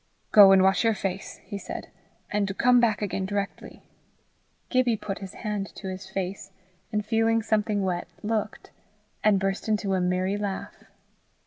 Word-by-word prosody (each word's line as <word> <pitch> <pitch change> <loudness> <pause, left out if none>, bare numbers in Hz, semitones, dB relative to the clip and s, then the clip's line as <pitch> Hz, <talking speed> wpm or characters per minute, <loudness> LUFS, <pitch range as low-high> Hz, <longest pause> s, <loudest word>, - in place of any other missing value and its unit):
"Go 200 -2 +9
and 190 -1 +6
wash 190 +3 +3
your 225 -1 +3
face," 195 -1 -4
he 200 -2 -6
said, - - -7 0.4
"and 200 -2 -1
come 250 0 +5
back 220 -3 +2
again 195 -1 -2
directly." 200 0 -4 0.9
Gibbie 250 -3 +2
put 200 -1 -5
his 195 -1 -8
hand 210 -3 -3
to 190 - -6
his 185 0 -7
face, 195 0 -4 0.4
and 210 -1 -1
feeling 225 0 +2
something 210 -1 +1
wet, 180 -2 -2 0.2
looked, 215 0 -3 0.5
and 210 -2 +4
burst 195 +2 -2
into 205 -2 0
a 185 - +1
merry 185 +2 0
laugh. 200 -2 -5
200 Hz, 155 wpm, -26 LUFS, 195-215 Hz, 0.9 s, Go